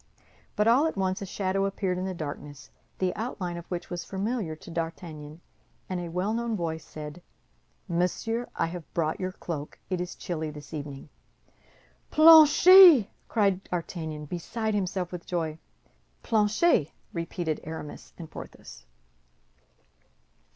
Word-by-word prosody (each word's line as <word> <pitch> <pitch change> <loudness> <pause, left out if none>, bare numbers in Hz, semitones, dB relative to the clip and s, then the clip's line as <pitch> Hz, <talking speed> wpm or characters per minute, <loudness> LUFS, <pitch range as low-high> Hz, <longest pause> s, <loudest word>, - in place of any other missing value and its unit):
But 210 +1 +2
all 260 +7 +5
at 320 - -4
once 190 0 0
a 195 - -5
shadow 195 +1 -1
appeared 190 -2 -1
in 185 - -2
the 190 -1 -3
darkness 145 -3 -7 0.3
the 185 -1 0
outline 195 -6 -4
of 170 0 -8
which 175 0 -5
was 175 0 -3
familiar 195 -3 -3
to 165 - -12
D'Artagnan, 165 -2 -6 0.5
and 185 -1 -3
a 175 -1 -5
well 180 +5 -1
known 235 -1 -1
voice 160 -4 -3
said, 150 +2 -9 0.7
"Monsieur, 190 +7 -1
I - - +1
have 170 -1 -7
brought 160 -2 0
your 185 0 -2
cloak; 155 -5 -6
it 180 -1 0
is 180 - -5
chilly 160 -4 -4
this 150 +1 -11
evening." 145 -1 -7 1.0
"Planchet!" 320 - +9 0.2
cried 195 -3 +1
D'Artagnan, 160 -3 -4
beside 215 +7 -3
himself 185 -3 -2
with 175 -2 -7
joy. 160 -3 -2 0.6
"Planchet!" 215 - +3 0.2
repeated 170 -2 -3
Aramis 160 -1 -8
and 165 - -8
Porthos. - - -11
180 Hz, 135 wpm, -27 LUFS, 160-205 Hz, 1.0 s, Planchet